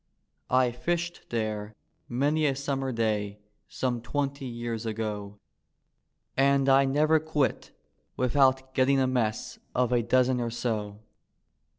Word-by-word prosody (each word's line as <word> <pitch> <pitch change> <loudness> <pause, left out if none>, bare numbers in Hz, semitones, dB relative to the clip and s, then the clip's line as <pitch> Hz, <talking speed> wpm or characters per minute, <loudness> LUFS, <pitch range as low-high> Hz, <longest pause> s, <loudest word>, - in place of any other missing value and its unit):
I 130 -1 +3
fished 170 +7 -3
there 110 -2 -3 0.3
many 145 +5 +1
a 135 - +1
Summer 135 -1 -2
day 105 -3 -1 0.3
some 125 -2 -2
twenty 140 +1 -2
years 120 -1 -4
ago. 105 -2 -4 1.0
And 135 0 +3
I 135 0 +6
never 155 +4 +3
quit 155 -3 -1 0.5
without 130 +1 +2
getting 135 +1 +3
a 130 - +3
mess 120 -4 -1 0.2
of 125 -1 +2
a 120 - +3
dozen 125 +2 +2
or 120 - -1
so. 110 -3 -3
130 Hz, 120 wpm, -28 LUFS, 115-135 Hz, 1.0 s, I